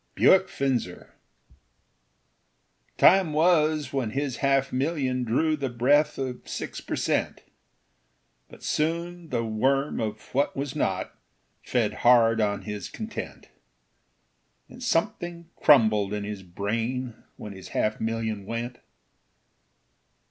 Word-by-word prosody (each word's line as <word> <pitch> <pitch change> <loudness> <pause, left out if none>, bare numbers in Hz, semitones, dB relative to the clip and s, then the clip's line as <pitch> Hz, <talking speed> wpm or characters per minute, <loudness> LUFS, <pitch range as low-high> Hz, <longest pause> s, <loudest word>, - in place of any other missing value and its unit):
Bewick 190 0 +5
Finzer 125 -10 -2 1.9
Time 185 -3 +5
was 155 -3 +2
when 130 -5 -1
his 135 +1 -2
half 135 -1 +1
million 130 -2 0
drew 155 +7 +1
The 140 -3 -3
breath 135 +6 +2
of 130 -2 -4
six - - -5
per - - -4
cent; - - -1 1.1
But - - -15
soon 170 +2 -2
the 120 -4 -1
worm 135 +6 0
of 110 -1 -3
what 140 +1 0
was 140 -1 -3
not - - -1 0.5
Fed - - 0
hard 115 -2 +5
on 100 -1 0
his 105 -3 -6
content; 220 0 -7 1.2
And 250 - -13
something 170 -5 -2
crumbled 110 -7 +4
in 105 -1 -3
his 105 -1 -5
brain 115 +7 -3 0.2
When 105 - -8
his 95 -1 -10
half 110 0 -1
million 110 -3 -2
went. 120 +1 -4
130 Hz, 115 wpm, -26 LUFS, 110-150 Hz, 1.9 s, Bewick